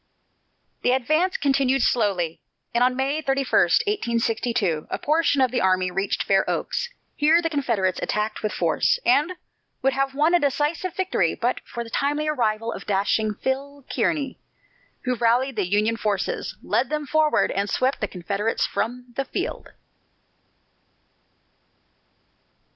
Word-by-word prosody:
The 245 - +3
advance 310 +8 +1
continued 270 -2 +2
slowly, 190 -8 0 0.3
and 235 +1 +3
on 250 0 +3
May 275 +4 0
31, 275 -1 0 0.4
1862, 230 - 0
a - - -2
portion 300 -2 +2
of 255 - +3
the 250 - 0
army 185 -1 +2
reached 195 +2 -1
Fair 195 -1 +3
Oaks. 480 -1 -2 0.3
Here 315 +3 +4
the 330 -1 -1
Confederates 230 - 0
attacked 210 +1 -2
with 215 - -1
force, - - +1
and 305 +6 +3 0.5
would 270 0 +3
have 270 0 -1
won 305 +4 +3
a 350 - +6
decisive 295 +5 -1
victory 365 - 0
but 245 +2 -1
for 235 - -5
the 230 - -12
timely 295 +4 0
arrival 225 -6 0
of - - -9
dashing 210 +2 +1
"Phil" 275 +1 -3
Kearny, 280 -5 -1 0.7
who 255 - 0
rallied 245 +3 +2
the 200 -4 -1
Union 215 +3 +2
forces, 205 -4 -2
led 245 +1 0
them 300 0 -2
forward, 310 +2 +2
and 200 +1 -1
swept 260 +5 0
the 210 - 0
Confederates 200 +5 -1
from 245 +2 -4
the 275 - -1
field. - - -4
255 Hz, 140 wpm, -24 LUFS, 215-285 Hz, 0.7 s, a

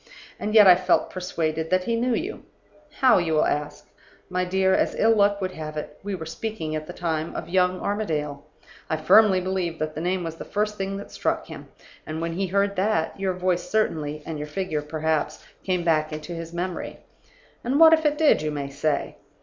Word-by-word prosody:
And 215 +1 -2
yet 215 -2 +9
I 185 - +10
felt 180 0 +1
persuaded 160 -3 -2
that 185 0 +2
he 230 +4 0
knew 240 +1 +1
you. 375 +6 -4 0.6
'How?' 255 -7 +6
you 165 -2 -1
will 155 - +3
ask. 150 0 -3 0.4
My 180 0 0
dear, 190 +1 +2
as - - +1
ill 225 +1 +4
luck 205 -1 +3
would 185 -1 -2
have 155 -2 -7
it, 150 - -7
we 200 0 -4
were 160 -3 -7
speaking 160 -2 -4
at 155 0 -5
the - - -6
time 160 -2 -3
of - - -5
young 180 0 +2
Armadale. 155 -9 -2 0.5
I 160 - 0
firmly 190 +4 +5
believe 180 -3 -2
that 155 0 -3
the 155 - -5
name 180 +1 -1
was 165 -1 -5
the - - -6
first 210 +1 -2
thing 195 0 -3
that 200 - -9
struck - - -1
him; - - -10 0.4
and 155 +1 -4
when 165 0 -2
he 190 +3 -1
heard 200 +2 +1
that, 185 -3 0
your 190 -1 0
voice 180 -1 -1
certainly 155 -8 -1
and 160 -2 -5
your 150 - -5
figure 155 -1 -2
perhaps, 155 0 -2 0.2
came 180 -2 0
back 155 -2 +2
to 165 +3 -8
his 165 0 -6
memory. 175 +1 -4 0.7
'And 260 +4 +1
what 325 0 +9
if 315 0 +3
it 300 -1 +1
did?' 310 - +4
you 155 - -1
may 145 -2 -4
say. 145 +1 -1
180 Hz, 210 wpm, -24 LUFS, 155-200 Hz, 0.7 s, I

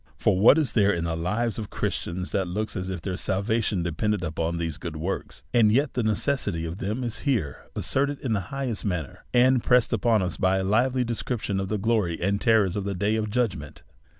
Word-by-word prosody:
For - - +2
what 115 +9 +7
is 155 -4 +1
there 105 -3 +4
in 85 -4 -1
the 85 -1 -1
lives 105 +8 -1
of 105 - -5
Christians 90 +2 -3
that 95 -2 0
looks 105 +5 -3
as 95 0 -3
if 90 -3 -5
their 95 -2 -3
salvation 100 -1 0
depended 95 +4 -1
upon 85 0 -2
these 80 -2 -3
good 85 -1 -6
works? 85 +5 -4
And 110 -3 +5
yet 135 +5 +2
the 125 - 0
necessity 110 - 0
of 80 +3 -6
them 110 +6 -2
is 120 -2 -4
here 120 - -2
asserted 140 +1 0
in 125 -4 -1
the 105 - +1
highest 135 -6 -3
manner, 90 -8 -4
and 125 0 +4
pressed 125 -2 +3
upon 115 -4 +2
us 90 - -3
by 95 0 +2
a 95 - 0
live 120 +7 +2
ly 130 - +2
description 115 -3 -2
of 95 - -2
the 105 - 0
glory 100 -5 0
and 100 +3 0
terrors 110 -6 +3
of 100 - -2
the 100 0 -3
day 105 +4 +1
of 110 -1 -1
judgment. 100 - -2
105 Hz, 220 wpm, -26 LUFS, 90-120 Hz, -, what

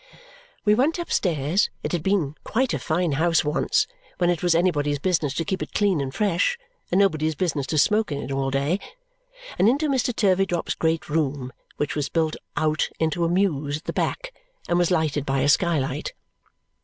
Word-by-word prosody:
We 210 - +5
went 275 +10 +2
upstairs 180 - 0
it - - -2
had 175 - -1
been 175 -5 0
quite 255 +3 0
a - - -1
fine 170 +1 0
house 160 +2 +2
once, 150 - +1 0.3
when 175 0 +2
it 170 - -2
was 175 -2 +3
anybody's 150 -5 +1
business 160 -2 0
to 165 - -1
keep 190 +3 -2
it - - -6
clean 195 -7 +2
and 135 -1 -3
fresh, 200 - +1 0.3
and 180 - +2
nobody's 160 -5 +2
business 150 -5 -1
to 155 - -1
smoke 210 +5 +3
in 145 - -2
it 140 - -5
all 135 0 0
day 140 +7 0 0.8
and 200 - +5
into 290 +5 +1
Mr. 260 -2 +1
Turveydrop's 190 -5 +1
great 160 0 -1
room, 145 -4 -1 0.2
which 150 - -2
was 150 -2 -1
built 160 -2 0 0.2
out 155 0 +1
into 160 +1 0
a - - +1
mews 155 -6 0
at 155 - -14
the - - -4
back - - -2 0.3
and 175 - +2
was 175 - +2
lighted 155 -5 +1
by 135 -1 0
a 140 - +2
skylight. 145 -3 +1
165 Hz, 190 wpm, -24 LUFS, 145-190 Hz, 0.8 s, We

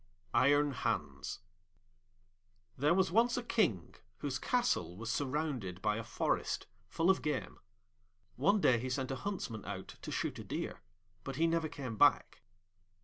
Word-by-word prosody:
Iron 145 +1 +4
Hans 130 - -2 1.3
There 150 +6 +3
was 190 -2 +2
once 235 +5 +3
a 245 - -1
King 175 - +1 0.2
whose 130 +1 -3
castle 185 - 0
was 115 +1 -3
surrounded 130 - -2
by 105 +2 +1
a 115 - -3
forest 115 - -1 0.2
full 165 - +3
of 190 - 0
game. 150 - -3 0.8
One 205 +2 +3
day 120 -7 +5
he 130 +2 -3
sent 130 0 -2
a - - -1
Huntsman 130 - -4
out 100 -2 -7
to - - -6
shoot - - -2
a - - -6
deer, - - -4 0.4
but 135 - -5
he 160 +4 +2
never 165 -1 +1
came 130 -8 -6
back. - - +4
140 Hz, 150 wpm, -34 LUFS, 115-170 Hz, 1.3 s, day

